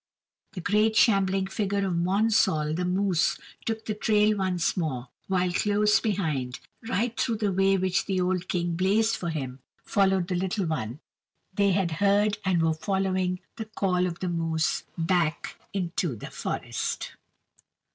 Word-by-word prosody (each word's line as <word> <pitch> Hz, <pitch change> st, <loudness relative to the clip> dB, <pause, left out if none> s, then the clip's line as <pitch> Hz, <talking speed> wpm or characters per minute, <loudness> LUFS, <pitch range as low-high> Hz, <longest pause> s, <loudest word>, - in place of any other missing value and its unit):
The 185 Hz, -, -5 dB
great 215 Hz, +4 st, +2 dB
shambling 195 Hz, -3 st, +3 dB
figure 200 Hz, 0 st, -1 dB
of 185 Hz, -, -1 dB
Monsall 185 Hz, -3 st, +2 dB
the 180 Hz, +1 st, -1 dB
moose 185 Hz, -1 st, +1 dB, 0.3 s
took 225 Hz, -1 st, -2 dB
the 215 Hz, -, -1 dB
trail 210 Hz, 0 st, +3 dB
once 185 Hz, -3 st, 0 dB
more, 135 Hz, -8 st, -3 dB, 0.2 s
while 185 Hz, -1 st, +1 dB
close 210 Hz, +3 st, +3 dB
behind, 150 Hz, -, -2 dB, 0.3 s
right 235 Hz, 0 st, 0 dB
through 230 Hz, -, 0 dB
the 210 Hz, -2 st, 0 dB
way 195 Hz, +1 st, +3 dB
which 180 Hz, -2 st, 0 dB
the 190 Hz, -2 st, 0 dB
old 180 Hz, 0 st, 0 dB
King 175 Hz, -1 st, -1 dB
blazed 205 Hz, +5 st, +2 dB
for 170 Hz, -, -4 dB
him, 135 Hz, -5 st, -4 dB, 0.2 s
followed 190 Hz, -3 st, +2 dB
the 185 Hz, -, -2 dB
little 190 Hz, +2 st, -1 dB
one; 130 Hz, -4 st, -3 dB, 0.5 s
they 200 Hz, 0 st, +3 dB
had 185 Hz, -3 st, +1 dB
heard 205 Hz, +1 st, +3 dB
and 180 Hz, -3 st, +2 dB
were 160 Hz, 0 st, +3 dB
following 185 Hz, +1 st, -1 dB, 0.2 s
the 220 Hz, -, -4 dB
call 185 Hz, -4 st, 0 dB
of 170 Hz, -1 st, -5 dB
the 185 Hz, -, -1 dB
moose 165 Hz, -2 st, -1 dB
back 165 Hz, -2 st, 0 dB
into 175 Hz, -6 st, -2 dB
the 105 Hz, -, -9 dB
forest. -, -, -3 dB
185 Hz, 155 wpm, -27 LUFS, 170-205 Hz, 0.5 s, shambling